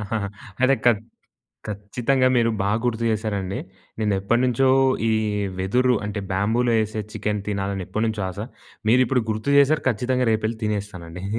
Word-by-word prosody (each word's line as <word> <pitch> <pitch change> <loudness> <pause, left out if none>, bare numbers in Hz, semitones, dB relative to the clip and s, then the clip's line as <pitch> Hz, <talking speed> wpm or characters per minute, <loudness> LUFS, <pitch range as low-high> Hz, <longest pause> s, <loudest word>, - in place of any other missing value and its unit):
ఆహాహా! 105 -1 -2 0.3
అదే 135 +1 +5
ఖ - - +7 0.8
ఖచ్చితంగా 120 +6 0
మీరు 115 -1 +3
బాగుర్తు 115 +3 0
చేసారండి. 100 -3 -2 0.4
నేను 105 -2 +1
ఎప్పటినుంచో 125 +5 +2 0.4
ఈ - - +3 0.5
వెదురు 125 +7 +2
అంటే 105 0 -3
బ్యాంబూలో 115 +5 +1
ఎసే 110 +1 -4
చికెన్ 105 -2 -2
తినాలని 100 -2 -2
ఎప్పటినుంచో 110 -1 -1
ఆశ. 95 - -11 0.5
మీరు 125 +3 +5
ఇప్పుడు 125 -1 +1
గుర్తు 110 +6 -1
చేసారు 145 +2 +4
ఖచ్చితంగా 125 +2 0
రేపెళ్లి 110 +1 0
తినేస్తానండి. 95 -4 -4
110 Hz, 130 wpm, -23 LUFS, 100-125 Hz, 0.8 s, ఖ